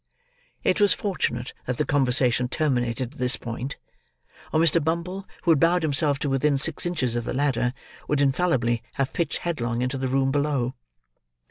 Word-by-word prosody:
It - - +2
was 205 -2 +5
fortunate 125 - -2
that 125 -1 -1
the - - +1
conversation 125 -3 +2
terminated 125 -3 -1
at 155 - -16
this 125 +1 +1
point, 120 +3 -5 0.7
or 155 - +2
Mr. 165 -1 +4
Bumble, 170 +5 -2 0.2
who 170 - +4
had 155 - +4
bowed 170 +2 +3
himself 145 -1 +1
to 145 - 0
within 140 +1 +2
six 160 +4 -1
inches 130 -9 -1
of 120 - -1
the - - -3
ladder, 130 -3 +1 0.4
would 150 - +1
infallibly 135 -5 +2
have 135 -1 -1
pitched 165 -4 -1
headlong 120 -8 -1
into 130 +1 -2
the 130 - -1
room 135 +1 +1
below. 140 -3 0
135 Hz, 170 wpm, -25 LUFS, 125-160 Hz, 0.7 s, was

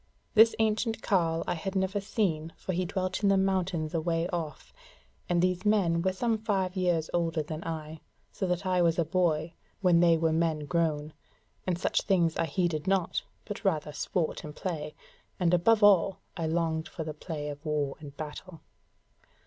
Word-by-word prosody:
This 225 0 +7
ancient 220 +1 0
carle 165 -5 +1
I - - 0
had 190 +4 -4
never 190 +2 0
seen, 165 -6 -1
for 185 - -4
he 180 +1 0
dwelt 185 +1 -2
in 200 - +3
the 195 - +4
mountains 185 -4 0
a 165 - 0
way 165 0 0
off, 160 -5 -5 0.6
and 175 0 +2
these 180 0 +1
men 190 -6 +3
were 190 +2 +1
some 225 +3 0
five 195 -3 -1
years 175 -4 0
older 165 -2 0
than 155 +2 -6
I, 160 -1 -5 0.3
so 190 - -2
that 180 +2 -1
I 185 -1 +2
was 170 -1 +3
a 170 - +2
boy 165 -2 +1 0.3
when 180 -3 +5
they 170 -1 +5
were 160 0 +1
men 160 -2 0
grown; 155 -2 0 0.5
and 180 -2 +1
such - - +1
things 175 -5 +2
I 165 - +1
heeded 165 0 -1
not, 190 -3 +1 0.2
but 205 - -6
rather 155 -6 0
sport 165 +2 -2
and 150 0 -8
play; 155 -5 -4 0.4
and 175 -1 +2
above 210 +5 +4
all, 195 -2 +5 0.2
I 165 -3 -2
longed 160 0 0
for 170 - -6
the 155 -1 -5
play 150 -1 -5
of 145 +1 -8
war 150 -3 -1
and 145 -2 -11
battle. 160 +3 -8
170 Hz, 185 wpm, -29 LUFS, 160-190 Hz, 0.6 s, This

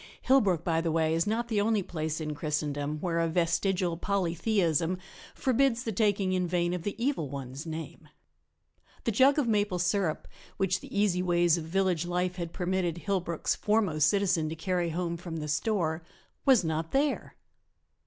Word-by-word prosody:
Hillbrook, 205 - +3
by 165 -1 +1
the 165 -1 -1
way, 160 0 +2
is 165 +3 +1
not 230 +3 0
the 215 -3 +1
only 215 -1 +1
place 155 -2 -3
in 155 -1 -3
Christendom 150 0 -2
where 170 -2 0
a 165 - +2
vestigial 175 +1 0
polytheism 180 -2 0 0.4
forbids 255 -1 +2
the 225 - -2
taking 200 -2 +1
in 180 -1 0
vain 175 0 0
of 180 - -3
the 205 +4 -3
Evil 235 - -1
One's 135 +2 -6
name. 160 0 -7 0.9
The 230 - +1
jug 265 +7 +5
of 285 -5 +2
maple 205 -4 +1
sirup 175 -2 0 0.3
which 190 -1 +1
the 200 - -5
easy 190 -3 +2
ways 175 -2 +3
of 165 -2 -4
village 180 -1 0
life 180 +1 -1
had 170 -2 -4
permitted 180 -2 -1
Hillbrook's 180 -3 -1
foremost 195 -9 +2
citizen 180 -4 +1
to 160 - -4
carry 175 +1 -1
home 170 +1 -2
from 170 -1 -6
the 150 -1 -4
store 165 -1 0 0.5
was 255 -8 +6
not 160 0 -2
there. 280 +2 0
175 Hz, 170 wpm, -29 LUFS, 165-200 Hz, 0.9 s, was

